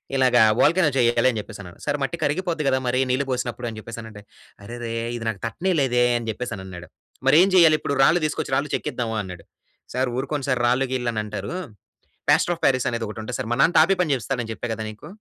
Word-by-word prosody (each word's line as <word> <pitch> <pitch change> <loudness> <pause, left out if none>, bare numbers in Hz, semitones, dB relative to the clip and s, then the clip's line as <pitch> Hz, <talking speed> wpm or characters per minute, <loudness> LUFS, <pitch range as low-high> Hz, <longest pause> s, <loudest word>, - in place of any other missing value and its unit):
"ఇలాగా 125 -3 +4 0.2
వోల్కానో 165 0 +4
జెయ్యాలి" 120 0 +3
అని 115 - -5
జెప్పేసన్నాడు. 100 -5 -11
సారు 145 - 0
మట్టి 170 +5 -3
కరిగిపోద్ది 160 0 -1
గదా! 130 -1 +2
మరి 125 +1 +1
నీళ్లు 135 +2 0
పోసినప్పుడు 120 -1 -3
అని 110 - -9
జెప్పేసనంటే 110 -2 -9 0.4
"అరెరే! 120 0 -6 0.2
ఇది 115 - -7
నాకు 105 -4 -5
తట్టనే 180 +11 -1
లేదే!" 125 -2 +2
అని 115 -1 -6
జెప్పేసనన్నాడు. 95 -7 -7 0.4
మరేం 180 +6 +6
జెయ్యాలిప్పుడు? 155 -4 +5
రాళ్ళు 165 +5 +4
తీసుకొచ్చి 145 -3 -3
రాళ్ళు 140 +1 -1
చెక్కిద్దామా 115 -2 -3
అన్నాడు? 90 -2 -10 0.5
సారు 130 0 +1
ఊరుకోండి 140 +1 -2
సారు 125 -1 +1
రాళ్ళు 130 +2 +2
గీల్లు 120 -2 -1
అనంటారు. 105 +9 -4 0.8
పాస్టర్ 175 - +4
అఫ్ - - -20
పారిస్ 130 -2 +2
అనేదొకటుంటది 115 0 -4
సారు - - -3
మా - - -2
నాన్న 175 - +4
టాపి 195 - +5
పని 165 -5 0
జేపిస్తాడని 120 -2 -3
చెప్పా 120 - -5
కదా! 110 - -5
నీకు. 110 +7 -11
125 Hz, 185 wpm, -23 LUFS, 115-140 Hz, 0.8 s, మరేం